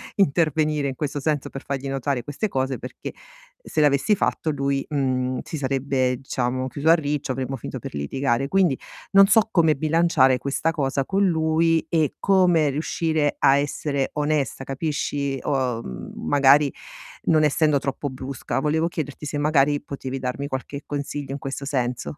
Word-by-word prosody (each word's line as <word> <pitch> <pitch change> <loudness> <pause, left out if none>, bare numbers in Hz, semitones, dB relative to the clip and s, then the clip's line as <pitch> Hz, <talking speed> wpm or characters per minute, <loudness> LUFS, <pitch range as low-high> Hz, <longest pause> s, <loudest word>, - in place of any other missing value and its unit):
intervenire, 155 -4 +2
in 130 - -3
questo 145 0 -3
senso, 150 -1 -1
per 135 - -7
fargli 140 0 -4
notare 135 -2 -2
queste 145 +9 -3
cose, 130 - -2
perché 125 - -7 0.5
se - - -3
l'avessi 145 +8 +3
fatto 160 - -1
lui, 140 -1 0
mhmm, 130 -3 0
si 160 - -6
sarebbe 135 -2 0
diciamo 130 -1 -2
chiuso 145 +4 -1
a - - +9
riccio, 145 -3 -2
avremmo 130 +1 -3
finito - - -6
per - - -8
litigare. 120 - -1
Quindi 180 -6 +2 0.3
non 195 0 +7
so 220 +2 +4
come 160 -4 +4
bilanciare 155 -4 +3
questa 155 +4 -1
cosa 135 -3 -1
con 195 +1 +1
lui 160 0 +2
e 160 -4 +1
come 175 -6 +3
riuscire 155 +1 0
a 135 +1 +5
essere 140 -1 -1
onesta, 150 -3 -1
capisci? 140 -1 -2
O, 130 -4 0
mhmm, 60 - -7 0.2
magari 145 0 +5 0.5
non 155 -2 +4
essendo 150 0 +3
troppo 140 +1 -3
brusca. 130 -1 -4
Volevo 160 +3 +1
chiederti 150 -3 -5
se 145 - -3
magari 145 -1 +3
potevi 135 -2 -6
darmi 130 +2 -3
qualche 140 +1 -5
consiglio 145 -1 -4
in - - -3
questo 135 0 -5
senso. 125 0 -2
140 Hz, 160 wpm, -23 LUFS, 135-155 Hz, 0.5 s, a